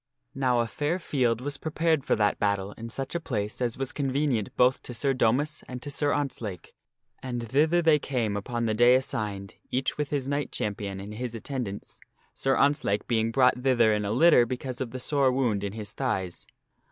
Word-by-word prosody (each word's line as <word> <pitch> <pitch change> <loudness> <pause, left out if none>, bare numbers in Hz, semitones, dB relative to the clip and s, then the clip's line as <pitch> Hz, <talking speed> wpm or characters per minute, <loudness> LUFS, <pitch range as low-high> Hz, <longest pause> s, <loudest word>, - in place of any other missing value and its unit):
Now 125 -3 +2
a - - 0
fair 145 - -1
field 125 -9 0
was 140 +1 -4
prepared 160 -2 0
for - - +2
that 105 -1 +1
battle 100 -1 0
in 115 +2 -8
such 135 +3 -4
a 170 - 0
place 110 -8 -3
as 120 -2 -1
was 135 -1 -2
con 140 -2 -2
venient 130 -6 0
both 125 +1 +4
to 125 - -7
Sir 135 +3 +1
Domas 130 +5 +1
and 125 0 -6
to 145 - -5
Sir 145 +1 +1
Ontzlake, 115 - -3 0.5
and 120 -2 -4
thither 155 +8 +3
they 160 -2 +5
came 120 -7 -1
upon 115 +3 -2
the 110 - +1
day 120 +3 +6
assigned, 105 -6 -2 0.2
each 130 +3 -1
with 145 -2 -1
his 140 -3 -2
knight 140 +1 -2
champion 100 -2 -3
and 100 +2 -7
his 120 +1 -5
attendants, 115 -4 -5 0.3
Sir 135 0 +1
Ontzlake 135 -8 +2
being 115 -1 +1
brought 125 +1 +4
thither 120 -4 +3
in 105 0 0
a 100 - -2
litter 125 -1 +5
because 130 +1 -4
of 130 - -2
the 130 +2 -6
sore 135 0 +2
wound 120 -6 0
in 100 -1 -3
his 105 -2 -6
thighs. 95 -10 -3
125 Hz, 200 wpm, -27 LUFS, 110-140 Hz, 0.5 s, day